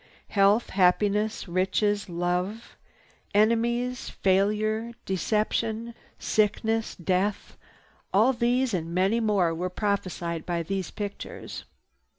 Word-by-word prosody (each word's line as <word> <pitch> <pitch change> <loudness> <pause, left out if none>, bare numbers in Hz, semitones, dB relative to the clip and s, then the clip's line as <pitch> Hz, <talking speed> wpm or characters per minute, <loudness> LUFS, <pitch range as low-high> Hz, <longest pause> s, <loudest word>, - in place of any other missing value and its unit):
Health, 200 +3 +3
happiness, 205 +4 +2
riches, 195 +3 0
love, 180 +6 -2 0.6
enemies, 235 +3 +1
failure, 215 +4 +1
deception, 220 +4 -1 0.2
sickness, 220 +1 0
death—all 195 +4 -1
these 245 0 +1
and 170 -1 -2
many 195 +5 +2
more 200 -7 +2
were 180 +3 -2
prophesied 180 -4 -2
by 170 -1 -2
these 190 +1 -3
pictures. 205 -2 -7
205 Hz, 90 wpm, -27 LUFS, 185-225 Hz, 0.6 s, Health